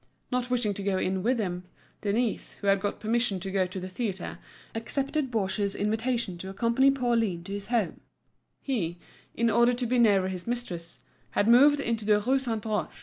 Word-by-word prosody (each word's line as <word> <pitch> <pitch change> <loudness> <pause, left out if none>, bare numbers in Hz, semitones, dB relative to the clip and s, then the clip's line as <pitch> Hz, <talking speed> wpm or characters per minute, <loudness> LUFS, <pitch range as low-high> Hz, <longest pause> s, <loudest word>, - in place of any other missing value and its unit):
Not 250 0 -1
wishing 240 -5 +1
to 200 - -6
go 195 -1 0
in 185 0 0
with 245 +5 +2
him, 180 -4 -3 0.4
Denise, 220 +2 -1
who - - -10
had 195 0 +4
got 205 +1 -3
permission 220 -2 +1
to 195 +1 -4
go 190 -1 +1
to 185 +1 -6
the 185 - -5
theatre, 190 -1 -4 0.3
accepted 275 +5 -2
Baugé's 200 -3 -1
invitation 220 -3 -1
to 190 - -6
accompany 230 +7 +3
Pauline 230 -9 +1
to 195 - -6
his 200 0 -4
home—he, 220 - -4 0.4
in 235 0 +2
order 235 +3 +4
to 245 0 -2
be 245 +1 +1
nearer 200 -5 +4
his 185 0 -6
mistress, 180 -9 -4 0.3
had 205 - +1
moved 280 +5 +7
into 230 -5 -1
the 210 0 +4
Rue 260 +6 +2
Saint 225 -5 -3
Roch. 215 -1 -1
215 Hz, 185 wpm, -28 LUFS, 195-240 Hz, 0.4 s, moved